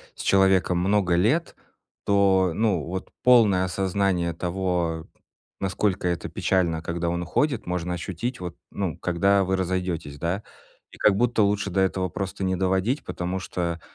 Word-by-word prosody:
с - - -8
человеком 95 -2 +3
много 95 -1 +2
лет, 115 - +1 0.5
то, 95 -2 +3
ну, 100 -4 +1
вот 95 +4 -5
полное 110 -7 +5
осознание 95 -2 0
того, 85 -2 -2 0.5
насколько 95 -1 0
это 85 -1 -3
печально, 85 -4 0
когда 85 +1 -2
он 85 0 -2
уходит, 135 - 0
можно 90 0 -2
ощутить, 90 +8 -4
вот, 90 -2 -6
ну, 95 -6 -3
когда 95 +3 +2
вы 95 +1 0
разойдетесь, 90 -5 -2
да? 85 +7 -2 0.5
И, - - -12
как 100 - +3
будто, 120 0 +2
лучше 100 0 +1
до 95 +1 +1
этого 95 0 0
просто 95 +1 -5
не 95 0 0
доводить, 95 - 0
потому 90 +2 -3
что 85 -2 -3
95 Hz, 150 wpm, -25 LUFS, 85-100 Hz, 0.5 s, полное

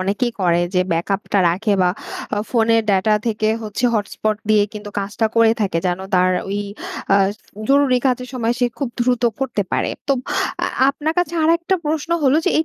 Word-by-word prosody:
অনেকেই 205 +6 -1
করে 175 -1 +3
যে 180 - +4
ব্যাকআপ 195 +4 0
টা 200 - +4
রাখে 205 +5 0
বা 180 - +4 0.5
আ - - +1
ফোনের 230 -1 +3
ডেটা 200 +3 +3
থেকে 215 -1 0
হচ্ছে 215 +3 -4
হটস্পট 215 0 -1
দিয়ে 210 -1 +5
কিন্তু 210 -1 -8
কাজটা 205 +3 -1
করে 225 -1 +5
থাকে। 190 -5 0
যেন 175 0 0 0.2
তার 185 0 +4 0.2
ঐ - - -4 0.6
আ - - +6 0.5
জরুরি 275 -2 +4
কাজের 250 0 0
সময় 235 -1 0
সে 245 - +3
খুব 275 -4 -1
দ্রুত 245 0 +1 0.2
করতে 245 -6 -1
পারে। - - 0 0.2
তো - - +5 0.5
আ - - +1 0.2
আপনার 300 +3 -1
কাছে 345 -1 0
আরেকটা 335 +3 +2
প্রশ্ন 315 +2 -2
হলো 275 +2 +4
যে 370 - +2
এই 320 - +2
225 Hz, 185 wpm, -20 LUFS, 200-260 Hz, 0.6 s, আ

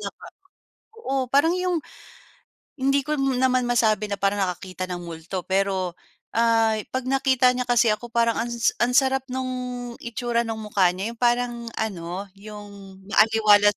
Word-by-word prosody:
naka - - -8 0.7
oo, 265 - -1
parang 285 +5 +4
'yong 365 -2 0 1.0
hindi 275 +1 +2
ko 305 - 0
m 270 -2 0
naman 255 -1 +3
masabi 220 -3 +2
na 200 - -1
parang 200 0 +1
nakakita 185 0 -5
ng 175 -1 -4
multo. 170 +2 -6
Pero, 190 -1 0 0.4
ay 225 -2 +3
'pag 260 -1 -2
nakita 260 -1 +3
niya 250 0 -2
kasi 240 -1 +4
ako, 215 +3 -5
parang 230 -1 +2
ans 235 0 0
ang 240 +1 +2
sarap 265 -1 +3
no'ng 250 -1 -4
itsura 235 0 -1
no'ng 225 -1 -4
mukha 200 -3 +3
niya. 195 +5 -4
'Yong 235 - -17
parang 245 0 +2 0.2
ano, 190 -2 -4
'yong 200 -2 -11
maaliwalas 210 -2 +5
230 Hz, 155 wpm, -24 LUFS, 200-255 Hz, 1.0 s, maaliwalas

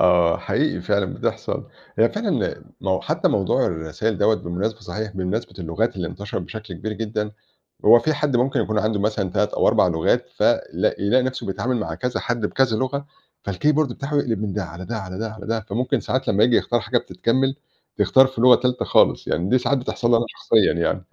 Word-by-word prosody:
آه 90 -2 +4
حقيقي - - -1
فعلًا - - 0
بتحصل، - - -3 0.3
هي - - +5
فعلًا - - -2 0.4
حتى - - +1
موضوع - - +1
الرسايل 85 +6 -2
دوّة 110 +2 +4
بمناسبة 100 +5 -3
صحيح 105 +2 -5
بمناسبة 95 +5 -3
اللغات 95 +6 -1
اللي 85 -3 -3
انتشرت 100 +1 -5
بشكل 110 -4 -8
كبير 110 +6 -5
جدًا، 105 -1 -3 0.5
هو 120 - +8
في 155 +5 0
حد 145 -3 0
ممكن 125 0 +1
يكون 110 0 0
عنده 110 0 0
مثلًا 105 -2 -1
3 - - +1
أو - - +3
4 - - +4
لغات 80 -2 +1
ف - - -6 0.3
لاق - - 0
يلاقي 120 +6 +3
نفسه 130 0 -3
بيتعامل 120 +6 -1
مع - - -3
كذا 125 -1 -2
حد 115 -3 -1
بكذا 130 -3 +1
لغة، 140 +4 -2 0.4
فالكيبورد 145 +8 +1
بتاعه 140 +3 -5
يقلب 115 -7 0
من 105 -2 -2
ده، 100 0 -2
على 85 +3 -9
ده، 115 +2 -4
على 95 -2 -6
ده، 110 0 -3
على 105 -3 -10
ده، 115 0 -1
فممكن 115 +5 -1
ساعات 130 +1 -2
لما 105 +2 +4
ييجي 120 -1 +4
يختار 120 - +1
حاجة 120 +3 +1
بتتكمل 130 +9 0 0.4
تختار 130 0 +5
في 130 -3 -6
لغة 125 +1 +8
تالتة 125 0 -1
خالص - - +3
يعني 90 +3 0
دي 130 - +4
ساعات 140 +2 +1
بتحصل 120 -1 -2
لي 120 - +6
أنا 115 - +1
شخصيًا 110 -3 +2
يعني. 85 0 -1
110 Hz, 200 wpm, -22 LUFS, 95-125 Hz, 0.5 s, هو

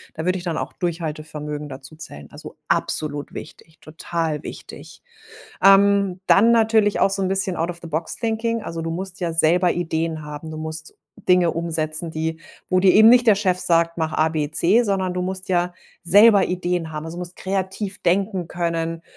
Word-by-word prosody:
Da 160 - -5
würde 185 +1 +1
ich - - -10
dann 170 -3 -3
auch - - -4
Durchhaltevermögen 155 -3 -5
dazu 135 +2 -10
zählen. 75 - -10
Also, - - -11
absolut 145 -2 -1
wichtig, 160 +1 -11
total 160 -1 -4
wichtig. - - -10 0.6
Ähm, 195 -1 +5
dann 225 +4 +5
natürlich 220 -2 +3
auch - - +4
so 195 0 -1
'n 190 - 0
bisschen 190 -1 -1
Out 170 +2 -1
of 170 - -8
the 170 - -8
Box 160 +1 -3
Thinking. 230 0 -2
Also, 165 -3 -5
du 165 - -3
musst 185 +2 -5
ja 170 -2 -2
selber 170 +2 +3
Ideen 160 -2 -2
haben. 150 +1 -8
Du 155 - -7
musst 160 0 -6 0.3
Dinge 180 -2 +4
umsetzen, 165 -1 -2
die 160 +1 -3 0.3
wo 185 0 +3
dir 185 -1 +5
eben 220 +1 +8
nicht 245 +1 +6
der 215 - +7
Chef 190 -3 0
sagt: 170 -1 +1
„Mach 160 -1 -1
ABC“, 160 +7 +2
sondern 190 -3 -1
du 180 0 -2
musst 185 +1 -3
ja 175 -1 0 0.3
selber 205 +2 +6
Ideen 175 -2 -2
haben. 155 0 -5
Also, 165 +1 -7
du - - -6
musst 180 0 -7
kreativ 190 +1 -4
denken 190 0 0
können, 165 -1 -3
175 Hz, 185 wpm, -21 LUFS, 160-190 Hz, 0.6 s, eben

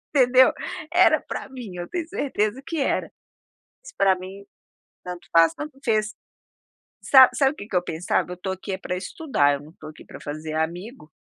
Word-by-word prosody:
entendeu? 255 -1 +6 0.4
Era 360 +1 +5
pra - - -6
mim, 245 -8 -9
eu 175 0 -5
tenho 345 -2 -3
certeza 255 - -1
que 330 0 -4
era, 275 - 0 0.7
mas - - -11
pra 195 -1 +4
mim 190 +2 -10 0.6
tanto 180 -1 -8
faz, 165 -1 +5
tanto 295 -2 -8
fez. 215 -2 0 0.9
Sabe 260 -2 +8
sabe 270 -2 +4
o - - -13
que 200 - -9
que 210 - -9
eu 180 - +3
pensava? 165 +2 -1
Eu - - -4
estou 190 +2 -4
aqui 190 +2 -8
é 190 - -3
pra 180 -1 -4
estudar, 180 - 0
eu 140 - -5
não 150 - -14
estou 155 -2 -11
aqui 155 - -15
pra - - -12
fazer 155 +1 -6
amigo. 170 - -4
195 Hz, 190 wpm, -24 LUFS, 175-260 Hz, 0.9 s, Sabe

